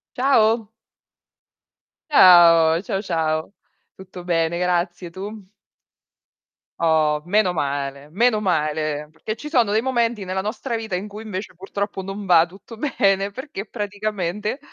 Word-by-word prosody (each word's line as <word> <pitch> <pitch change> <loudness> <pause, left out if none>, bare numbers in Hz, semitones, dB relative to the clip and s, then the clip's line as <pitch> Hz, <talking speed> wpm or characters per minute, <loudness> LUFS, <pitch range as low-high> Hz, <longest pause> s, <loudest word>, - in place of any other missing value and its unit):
Ciao. 230 -4 +3 1.4
Ciao, 170 - +7
ciao 195 -2 -3
ciao. 160 -3 -1 0.4
Tutto 185 -1 -11
bene 170 -1 0
grazie, 175 0 -1
tu? 195 +2 -9 1.3
Oh, 155 -2 +2
meno 195 0 +2
male, 140 -2 -3
meno 220 +5 +2
male, 155 -5 -1
perché 215 +7 -6
ci 300 - -8
sono 240 -8 +3
dei 220 +1 +2
momenti 235 -4 0
nella 185 +1 -2
nostra 220 +5 -4
vita, 220 -4 -3
in 190 +3 -5
cui 210 +1 -9
invece 195 -3 -6
purtroppo 195 +2 -5
non 195 +2 -6
va 170 -3 +5
tutto 195 +6 -13
bene, 200 -6 +1
perché 245 -3 -7
praticamente, 205 0 -3
190 Hz, 125 wpm, -22 LUFS, 170-215 Hz, 1.4 s, Ciao